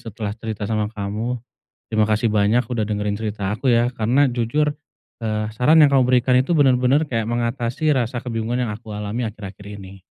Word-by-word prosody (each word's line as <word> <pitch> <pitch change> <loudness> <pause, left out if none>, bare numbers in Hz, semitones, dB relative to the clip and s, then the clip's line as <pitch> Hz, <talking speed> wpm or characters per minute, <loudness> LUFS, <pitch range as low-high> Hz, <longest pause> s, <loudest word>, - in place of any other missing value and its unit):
setelah 110 -2 -5
cerita 110 -2 -5
sama 105 0 -1
kamu. 110 +3 -3 0.6
Terima 110 -1 +2
kasih 110 +1 +1
banyak 105 +4 +3
udah 115 -3 -2
dengerin 105 -1 -1
cerita 105 -2 -3
aku 130 +5 -2
ya. 120 +1 +3
Karena 125 +6 +2
jujur, 145 +6 0 0.5
eee, 110 -1 -2
saran 150 +7 +5
yang 140 - +3
kamu 130 -2 +5
berikan 125 0 +3
itu, 165 +5 0
benar-benar 135 +1 +3
kayak 115 -5 -2
mengatasi 120 +5 0
rasa 120 -2 -1
kebingungan 120 +1 -2
yang 105 - -3
aku 105 -1 -8
alami 110 +3 -3
akhir-akhir 100 0 -9
ini. 95 0 -11
115 Hz, 175 wpm, -21 LUFS, 105-125 Hz, 0.6 s, saran